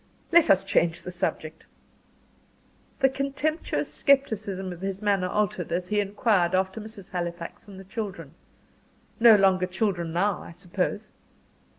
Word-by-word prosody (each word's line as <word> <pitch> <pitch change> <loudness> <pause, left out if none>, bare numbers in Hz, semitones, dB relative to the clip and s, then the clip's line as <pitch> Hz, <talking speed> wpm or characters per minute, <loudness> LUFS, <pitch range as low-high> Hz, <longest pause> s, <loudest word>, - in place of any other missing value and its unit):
Let 340 -1 +6
us 195 0 +5
change 170 -3 +1
the 180 - -6
subject." 160 -3 -4 1.3
The 270 - +6
contemptuous 275 +4 -2
scepticism 215 -9 +1
of 175 - -12
his 195 0 -3
manner 200 -3 +1
altered, 195 -5 -1
as 180 +1 -2
he 210 0 +1
inquired 200 -3 +1
after 190 +3 -1
Mrs. 210 -3 -11
Halifax 175 +1 -5
and 195 -2 -11
the - - -10
children. 200 0 -6 0.9
"No 230 -1 +8
longer 190 -2 +3
children 180 -3 -1
now, 185 +3 0
I - - -11
suppose?" 185 +5 -3
195 Hz, 135 wpm, -26 LUFS, 180-215 Hz, 1.3 s, No